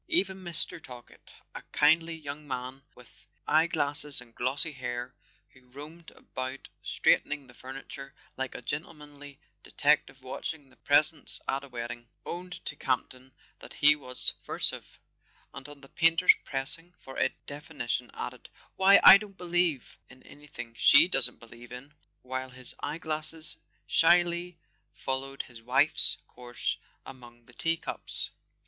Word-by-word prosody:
Even 195 - +2
Mr. 170 -2 0
Talkett—a 125 -2 -13
kindly 165 +2 +4
young 150 -1 -8
man 130 0 -5
with 125 - -19 0.2
eye¬ 160 +2 +3
glasses 145 -1 +2
and 120 -2 -11
glossy 140 +7 0
hair, 125 -2 -5 0.4
who 130 -1 -22
roamed 150 +6 -11
about 130 +1 -7
straightening 145 -1 +1
the 125 - -17
furniture, 135 +2 -9 0.2
like 130 0 -4
a - - -7
gentlemanly 145 -3 -7 0.2
detective 145 -2 +1
watching 140 +2 -6
the - - -21
presents 150 +3 +2
at 135 +1 -1
a - - -10
wedding—owned 120 +9 -7
to 150 - -4
Campton 130 -1 -3 0.3
that - - -12
he 150 +1 +6
was 130 -4 -10
subversive; - - 0 0.6
and 135 - -9
on 145 -1 -12
the 135 - -14
painter's 165 +4 +5
pressing 165 +6 -4
for 135 - -11
a - - +3 0.2
definition, 145 -5 -4
added: 125 0 -7 0.3
"Why, 195 +1 +7
I 200 - +11
don't 200 -2 -11
believe 175 -6 -1
in 130 0 -17
anything 130 -5 -11
she 165 - +7
doesn't 130 -8 +2
believe 115 +1 -14
in," 130 +4 -10 0.3
while 130 +1 -4
his 125 -1 +1
eye - - -3
glasses 155 0 0 0.3
shyly 175 +1 +3 0.4
followed 135 +1 -4
his 120 -2 -14
wife's 135 +6 +3
course 120 -1 -4 0.3
among 120 -2 -13
the 120 - -19
teacups. 165 +5 -3
140 Hz, 135 wpm, -29 LUFS, 125-160 Hz, 0.6 s, I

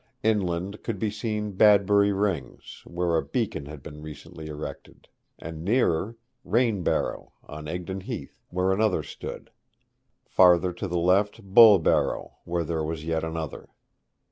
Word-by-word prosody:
Inland 100 -2 0
could 115 -4 -4
be 105 +2 -1
seen 105 -1 -3
Badbury 100 0 +5
Rings, 95 -10 -3
where 85 -1 -1
a - - 0
beacon 70 - -3
had 75 -2 -10
been 75 +2 -10
recently 80 +2 -10
erected; 75 0 -8 0.3
and 80 0 -8
nearer, 105 -1 +1 0.3
Rainbarrow, 115 -6 0
on 75 0 -9
Egdon 90 +3 -5
Heath, - - -7
where 90 +1 0
another 105 0 +1
stood: - - -8 0.7
farther 90 -1 +4
to 95 +3 -5
the 90 -1 -2
left 100 +6 +2
Bulbarrow, 100 -2 +5
where 85 0 -1
there 80 -1 -2
was 80 0 -4
yet 80 0 -1
another. 80 -2 -5
90 Hz, 135 wpm, -26 LUFS, 80-105 Hz, 0.7 s, Badbury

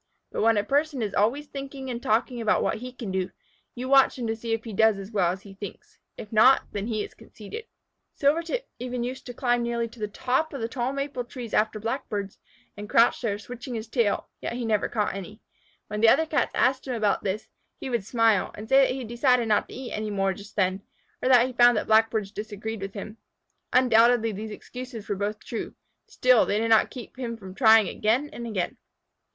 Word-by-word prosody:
But - - -2
when 225 0 +4
a 205 - +2
person 285 +1 0
is 205 - -3
always 240 +9 +1
thinking 275 -2 -7
and 240 0 -5
talking 235 +2 0
about 220 - +2
what - - 0
he 250 +2 -7
can 240 -6 -6
do, 185 0 -1 0.5
you 250 +1 -5
watch 270 0 +5
him 245 - -3
to 225 0 -1
see 230 +1 -6
if 225 0 -1
he 225 - -7
does 220 +1 +4
as 195 +2 -8
well 185 -5 +2
as 190 +2 -7
he 200 - -12
thinks. 420 - -10 0.2
If 210 - -9
not, 240 +5 +6
then 205 +1 -3
he 215 -3 -1
is - - -9
conceited. 335 - -10 0.5
Silvertip 335 - +1
even 250 0 -3
used 255 +2 -5
to 245 - -6
climb 245 -1 +1
nearly 235 0 -1
to 230 - -16
the 210 - -2
top 260 +9 -1
of 275 - -5
the 225 - -1
tall 245 +1 -2
maple 275 -2 -3
trees 240 -2 -8
after 215 0 +1
Blackbirds, 210 -4 -4 0.4
and 205 0 -8
crouch 230 +1 +4
there, 210 -5 -1
switching 245 +3 -7
his 220 0 -5
tail, 225 -3 0
yet - - -3
he 240 0 -3
never 215 -2 +1
caught 210 -3 -1
any. 195 +3 -8 0.5
When 210 0 -4
the 225 - +7
other 320 +7 +4
Cats 295 -6 0
asked 260 +1 +2
him 255 - -2
about 215 -3 +1
this, 200 +2 -2 0.3
he - - -5
would 235 -4 0
smile, 225 -2 +2
and 215 - -8
say 270 +3 +6
that - - -2
he 265 - -5
decided 240 +1 +2
not 210 - +2
to - - -9
eat 255 -1 -7
any 215 0 -3
more 195 -1 0
just 200 +2 -12
then, 190 -1 +1 0.4
or 255 - +1
that 250 -2 +7
he 245 - +2
had 250 - -11
found 240 -1 +6
that - - -1
Blackbirds 220 -2 +3
disagreed 215 0 -6
with 195 +1 -6
him. 210 +2 -7 0.5
Undoubtedly 235 -2 +4
these 215 +2 -6
excuses 245 +1 -8
were 205 - -1
both 205 +2 -3
true, 230 - -5 0.3
still 255 -2 +4
they 205 - +1
did 225 +1 0
not 220 -1 +5
keep 250 -1 -10
him 235 -2 -4
from 190 -4 -10
trying 220 -2 +6
again 245 +8 0
and 235 0 -6
again. 190 -6 -2
230 Hz, 225 wpm, -26 LUFS, 210-250 Hz, 0.5 s, the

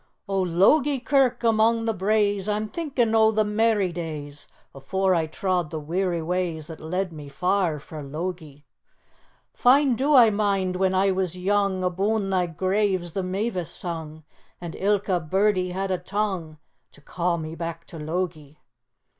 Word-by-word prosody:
"O 195 -1 0
Logie 255 - +3
Kirk, 255 -2 +2
among 225 0 +3
the 225 - +1
braes 205 0 +1
I'm 210 +1 -1
thinkin' 265 -8 -1
o' 220 -1 +5
the 215 0 +2
merry 210 -2 +1
days 150 -4 -6 0.3
Afore 190 +8 0
I 165 -2 +1
trod 180 0 -1
the 160 - -4
weary 170 +2 -1
ways 170 -2 -2
That 160 0 -9
led 180 +2 -3
me 150 -2 -9
far 180 0 0
frae 150 +1 -9
Logie. 150 0 -6 0.9
"Fine 270 +2 +4
do 285 +3 +3
I 235 -4 +7
mind 200 -3 0
when 190 0 +1
I 195 +1 +3
was 185 -2 -1
young, 195 0 +1
Abune 195 +3 0
thy 180 -2 +1
graves 185 +1 0
the 195 - -2
mavis 185 -1 -2
sung, 160 -3 -6 0.4
And 170 -2 -7
ilka 195 -2 +1
birdie 185 +3 +1
had 190 +2 -3
a 185 - 0
tongue 185 -5 -3 0.4
To 145 - -18
ca' 175 +3 -1
me 160 -1 -6
back 165 0 -6
to 165 - -10
Logie. 155 -2 -4
185 Hz, 155 wpm, -24 LUFS, 165-210 Hz, 0.9 s, I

